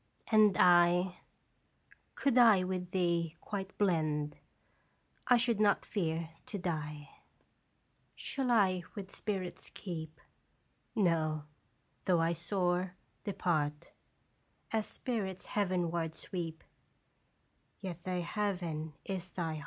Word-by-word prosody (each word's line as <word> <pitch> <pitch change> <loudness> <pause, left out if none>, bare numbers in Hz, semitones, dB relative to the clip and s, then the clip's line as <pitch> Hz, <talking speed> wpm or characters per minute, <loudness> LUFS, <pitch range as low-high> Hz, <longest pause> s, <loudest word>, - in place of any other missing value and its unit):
And 215 -3 +6
I 175 0 +5 1.0
Could 275 -3 +1
I 225 -7 +7
with 180 -1 -3
thee 170 -3 0
quite 195 -1 -5
blend, 155 -6 +1 0.9
I 245 - +7
should 235 -2 +1
not 205 -1 +3
fear 165 -4 -1 0.2
to 205 - -4
die. 150 -5 -3 1.1
Shall 265 -3 -2
I 190 -5 +4
with 200 -2 -6
spirits 190 -4 -3
keep? 160 -4 -6 0.8
No; 160 -6 +2 0.6
though 180 -3 +4
I 165 +1 +2
soar, 180 +1 0 0.3
depart 155 -7 -1 0.8
As 220 -2 0
spirits 200 -7 -3
heavenward 175 -5 0
sweep, 165 -3 -5 1.2
Yet 180 -3 -6
th' 180 -1 -2
heaven 170 -6 -2
is 185 -2 -4
thy 165 -3 -2
heart. 155 - -5
180 Hz, 105 wpm, -33 LUFS, 165-200 Hz, 1.2 s, I